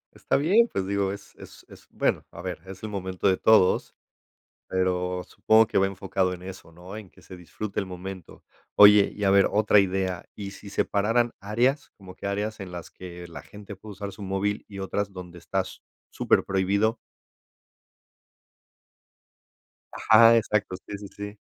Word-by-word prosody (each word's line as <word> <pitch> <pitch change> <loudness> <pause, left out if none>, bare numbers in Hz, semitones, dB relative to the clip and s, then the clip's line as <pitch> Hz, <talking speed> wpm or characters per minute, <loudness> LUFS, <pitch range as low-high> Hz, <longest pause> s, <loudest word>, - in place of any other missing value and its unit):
Está - - 0
bien, 200 +11 +4
pues 95 - -2
digo, 100 0 0
es 100 - -10
es - - -14
es, - - -16
bueno, - - 0
a 85 - -9
ver, 90 -3 -4
es 95 +1 -10
el 110 - -4
momento 95 -1 -2
de 95 -1 +3
todos, 110 -4 +3 0.7
pero, 90 -1 -1
supongo 110 0 +4
que - - -1
va 95 - +4
enfocado 95 -1 -1
en 90 - -9
eso, 95 -2 -10
¿no? 90 +4 -11
En 105 -4 -10
que - - -20
se 90 - -12
disfrute 100 +4 -5
el 100 - -2
momento, 95 -1 -9 0.3
oye, 105 0 +8
y 105 - -5
a - - +4
ver, 100 0 +5
otra 105 0 +4
idea, 95 -2 -1
¿y 100 -1 -6
si 100 +1 -11
separaran 115 +5 +1
áreas? 120 +8 0
Como 95 -2 -13
que - - -10
áreas 105 +2 -3
en 95 - -8
las 85 -1 -8
que 90 -1 -10
la 85 - -9
gente 105 0 -11
puede 105 +3 -12
usar 100 0 -6
su 105 - -10
móvil 100 +2 -2
y 100 -1 -9
otras 100 +1 -2
donde 90 -2 -9
está 95 +2 -2 0.5
superprohibido. 100 +4 +1 3.0
Ajá. 115 +1 +6
Exacto, 105 -4 0
sí, 100 - -5
sí, 100 0 -9
sí. 105 +1 -7
100 Hz, 170 wpm, -26 LUFS, 95-105 Hz, 3.0 s, oye